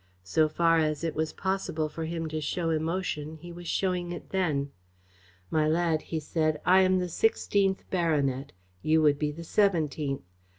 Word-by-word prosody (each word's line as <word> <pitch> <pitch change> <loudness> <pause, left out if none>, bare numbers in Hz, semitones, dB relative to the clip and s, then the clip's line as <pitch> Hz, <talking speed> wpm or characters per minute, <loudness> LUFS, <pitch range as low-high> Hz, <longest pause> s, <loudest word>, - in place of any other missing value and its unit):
So 155 +12 +2
far 165 +1 +3
as 155 0 0
it 165 -2 -1
was 155 0 -1
possible 190 -5 -1
for 160 +2 -5
him 165 0 -3
to 155 0 -3
show 165 +2 -1
emotion, 160 -1 -2
he 175 +2 -10
was 175 0 -9
showing 180 -2 0
it 175 - -8
then. 150 -7 0 0.8
"My 155 -1 +2
lad," 160 0 +2
he 160 - -4
said, 155 0 0
"I 185 +1 +6
am 185 0 +4
the 180 -1 0
sixteenth 195 +1 +1
baronet. 145 -7 0 0.3
You 155 +4 +3
would 145 -1 +4
be 150 -1 0
the 165 +3 -8
seventeenth. 155 - +1
160 Hz, 170 wpm, -28 LUFS, 155-175 Hz, 0.8 s, I